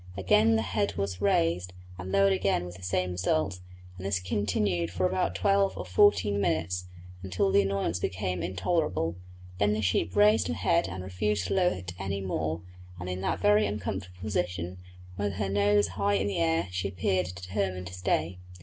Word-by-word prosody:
Again 105 +4 +4
the 110 - +1
head 100 +1 -1
was 100 -2 -3
raised, 90 -1 +1 0.3
and 90 +1 -6
lowered 100 0 +4
again 95 -2 +1
with 90 0 -8
the 95 - -13
same 90 0 -1
result, 90 0 0 0.4
and 95 - -8
this 100 -2 +1
continued 90 -2 0
for 90 +2 -1
about 90 -1 0
twelve 195 -1 +2
or - - -5
fourteen 255 - +3
minutes, 90 +1 -1 0.3
until 95 +1 0
the 100 - +5
annoyance 95 -3 -1
became 90 -1 -2
intolerable; 95 - -1 0.4
then 105 0 +3
the 110 - -1
sheep 95 -2 0
raised 105 0 +5
her 80 - -2
head - - +2
and 90 +1 -6
refused 95 +2 -1
to - - 0
lower 180 -2 +3
it 90 -1 -7
any 95 0 -2
more, 85 -3 -2 0.4
and 90 0 -5
in 90 +1 -4
that - - -1
very 105 0 +4
uncomfortable 95 -2 -5
position, 90 -3 -2 0.4
with 100 -1 -1
her 95 0 -2
nose 100 -1 +3
high 100 +2 0
in 100 0 +1
the 100 - -1
air, 85 +1 +1
she 90 +2 -2
appeared 90 -1 0
determined 90 +1 -3
to 85 - -8
stay. 90 -1 -1
95 Hz, 185 wpm, -28 LUFS, 90-100 Hz, 0.4 s, the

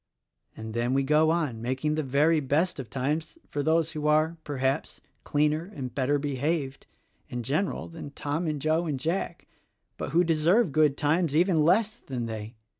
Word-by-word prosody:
And 110 0 -6
then 120 +3 0
we 135 - +2
go 155 +3 +4
on 155 -9 0
making 130 +5 -1
the 155 - 0
very 150 +4 +3
best 150 +5 0
of 125 -5 -6
times 150 - -2
for 145 - -3
those 160 +1 +2
who 150 -2 -3
are, 155 +2 +3
perhaps, 135 0 -2 0.2
cleaner 150 +5 0
and 130 -5 -5
better 140 +2 +1
behaved, 140 0 -2 0.4
in 120 -1 -4
general, 155 - -1
than 165 -3 -8
Tom 145 +4 -3
and 150 -2 -1
Joe 160 +4 +1
and 145 -4 -2
Jack, 170 +3 -3 0.5
but - - -4
who 170 +5 +3
deserve 170 +5 +3
good 150 -1 +3
times 160 0 +1
even 170 -1 +4
less 215 +7 +2
than 125 -3 -4
they. 110 0 -6
150 Hz, 175 wpm, -27 LUFS, 135-165 Hz, 0.5 s, go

